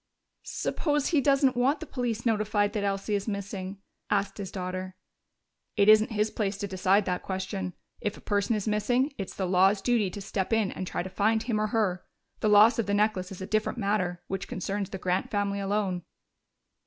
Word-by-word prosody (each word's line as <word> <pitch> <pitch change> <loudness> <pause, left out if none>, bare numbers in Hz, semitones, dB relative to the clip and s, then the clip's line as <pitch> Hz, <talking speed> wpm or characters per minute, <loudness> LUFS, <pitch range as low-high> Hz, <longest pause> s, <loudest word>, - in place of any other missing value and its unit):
"Suppose 295 -3 -1
he 310 -5 +3
doesn't 275 -1 +3
want 265 +5 +2
the - - -6
police 240 -3 -3
notified 210 -2 +1
that 210 -3 -1
Elsie 200 +1 -1
is 200 +1 -1
missing?" 200 -2 -4 0.3
asked 200 0 0
his 195 -2 -5
daughter. 185 0 -5 0.8
"It 200 - +4
isn't 215 0 +7
his 210 +1 +1
place 200 -2 -2
to 200 0 -3
decide 195 +1 +2
that 180 -1 -1
question. 190 -1 -4 0.2
If 210 0 -3
a - - -14
person 205 +2 0
is 210 0 -3
missing, 245 +7 +1
it's 195 - -5
the 190 - -1
law's 190 +2 +4
duty 220 -2 +1
to 205 - -7
step 195 0 -3
in 220 -3 +2
and 185 - -5
try - - -2
to 190 - -6
find 220 +4 +2
him 225 -3 0
or 215 - +1
her. 205 -5 0 0.4
The 215 - +1
loss 215 +3 +6
of 220 - 0
the 205 - +1
necklace 205 -3 +1
is 190 - -8
a - - -3
different 215 +4 0
matter, 195 -5 -1
which 195 0 -4
concerns 195 +1 -3
the 195 - -5
Grant 185 0 -1
family 200 -1 -1
alone." 195 -2 -1
205 Hz, 200 wpm, -28 LUFS, 190-215 Hz, 0.8 s, isn't